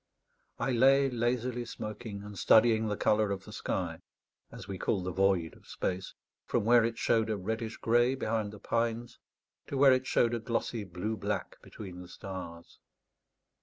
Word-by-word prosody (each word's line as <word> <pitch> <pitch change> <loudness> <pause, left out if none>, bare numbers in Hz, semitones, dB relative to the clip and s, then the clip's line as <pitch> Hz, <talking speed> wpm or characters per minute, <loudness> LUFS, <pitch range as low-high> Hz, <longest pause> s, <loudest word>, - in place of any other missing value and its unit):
I 135 - -1
lay 135 +2 +5
lazily 120 +1 -1
smoking 110 -2 -7
and 105 0 -9
studying 110 +3 +5
the 105 -1 -2
colour 105 -1 +2
of 100 -1 -3
the - - -10
sky, - - -3 0.5
as - - -10
we 95 -2 -5
call 95 -4 0
the 90 - -3
void 95 -3 +2
of - - -19
space, 95 +1 -3 0.3
from - - 0
where 120 0 +6
it 115 0 -1
showed 115 -1 +2
a 110 - 0
reddish 110 +3 -3
grey 120 +3 +3
behind 110 -4 -1
the 105 - -10
pines 115 +1 -2 0.5
to 140 - -3
where 135 -1 +7
it 130 0 0
showed 120 0 +2
a 120 - 0
glossy 115 -1 -2
blue 95 +5 -3
black 100 -1 -3
between 90 -4 -9
the 90 - -10
stars. 95 -4 -8
110 Hz, 170 wpm, -31 LUFS, 100-120 Hz, 0.5 s, where